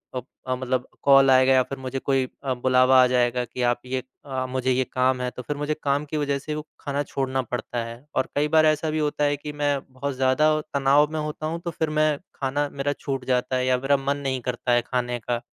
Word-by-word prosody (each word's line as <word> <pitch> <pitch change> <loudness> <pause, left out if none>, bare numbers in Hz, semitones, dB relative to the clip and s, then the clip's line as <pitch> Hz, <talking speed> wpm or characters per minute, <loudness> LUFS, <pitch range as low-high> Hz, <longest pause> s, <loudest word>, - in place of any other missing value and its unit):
अ 125 - -2 0.3
अ, 130 - +1
मतलब 130 0 -2 0.2
कॉल 135 -1 +6
आएगा 130 0 +5
या 130 - +5
फिर 135 - -7
मुझे 130 0 -4
कोई 135 -1 +1 0.2
अ, 130 -1 0
बुलावा 130 +1 +4
आ - - +4
जाएगा, 125 0 +1
कि 125 - -7
आप 120 0 +1
ये 130 0 -2 0.2
अ, 130 -2 -3
मुझे 130 0 0
ये 130 +1 +2
काम 130 0 +2
है 125 - -1
तो - - -8
फिर 145 +3 -4
मुझे 150 +1 -1
काम 145 +1 +1
की 155 +1 -4
वजह 140 -1 0
से 150 +2 -5
वो 150 - -3 0.2
खाना 145 0 -2
छोड़ना 135 -1 -2
पड़ता 120 0 -4
है। 115 +4 -10
और - - 0
कई 145 +1 +2
बार 155 0 +6
ऐसा 155 +1 +2
भी 155 - -1
होता 150 0 0
है 145 0 +2
कि 150 +1 -7
मैं 145 -1 0
बहुत 130 +1 -4
ज़्यादा 130 +4 +3 0.2
तनाव 140 +2 +4
में 155 - -1
होता 150 0 -4
हूँ, 165 +2 -3
तो 170 - -2
फिर 160 0 -2
मैं 155 -1 +2 0.2
खाना 140 +2 -1
मेरा 140 +1 -1
छूट 135 -2 -4
जाता 125 0 0
है 130 0 +1
या 130 0 +3
मेरा 140 +2 +2
मन 140 +1 -1
नहीं 135 -2 -2
करता 120 0 -2
है, 120 0 +4
खाने 125 -1 -1
का। 120 +1 -2
135 Hz, 245 wpm, -24 LUFS, 130-145 Hz, 0.3 s, कॉल